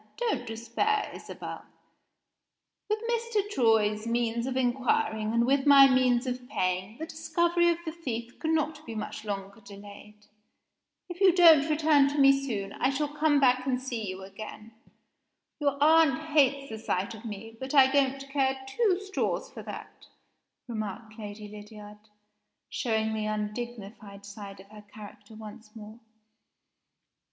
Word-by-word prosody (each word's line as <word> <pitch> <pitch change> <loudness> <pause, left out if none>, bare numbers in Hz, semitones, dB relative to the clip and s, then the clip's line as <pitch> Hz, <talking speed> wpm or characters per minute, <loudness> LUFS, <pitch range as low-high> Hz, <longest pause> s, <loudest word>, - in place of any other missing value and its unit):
Don't 480 -2 -2
despair, 235 - -1
Isabel. - - -8 1.3
With 425 - +1
Mr. 465 -3 -1
Troy's 220 - +2
means 235 0 -1
of 260 -1 -2
inquiring, 240 -4 0
and 235 +1 +2
with 270 +2 +1
my 275 -1 +9
means 255 -1 +2
of 250 0 -5
paying, 185 -2 -2
the 320 - -5
discovery 340 +2 +1
of 340 - +1
the 320 - -3
thief 245 -8 -6
cannot 315 -1 -1
be 230 - -6
much 215 0 -6
longer 200 0 -6
delayed. 205 +1 -13 0.8
If 355 +1 -9
you 385 -2 +7
don't 325 -4 +6
return 300 -2 +4
to 285 +1 -3
me 275 -1 +7
soon, 235 -8 -2
I 260 - 0
shall 290 +2 -1
come 295 0 +2
back 255 -1 +3
and 255 -1 +1
see 240 -6 -4
you 185 +1 -7
again. 215 +3 -10 0.9
Your 285 -2 0
aunt 310 -2 +5 0.2
hates 275 -2 +3
the 220 - -6
sight 200 0 -2
of 220 0 -11
me 225 0 -8
but 265 +2 -4
I 270 -2 +8
don't 275 -1 +1
care 265 -1 +1
two 390 - +1
straws 390 -1 -3
for - - -9
that," - - -10 0.6
remarked 215 0 -6
Lady 210 0 -8
Lydiard, 210 0 -12 0.7
showing 220 -3 -1
the 215 -1 -2
undignified 210 -2 -6
side 200 -1 -10
of 195 +2 -19
her 215 -1 -12
character 210 0 -13
once 215 0 -12
more. 215 +1 -11
240 Hz, 145 wpm, -28 LUFS, 215-285 Hz, 1.3 s, my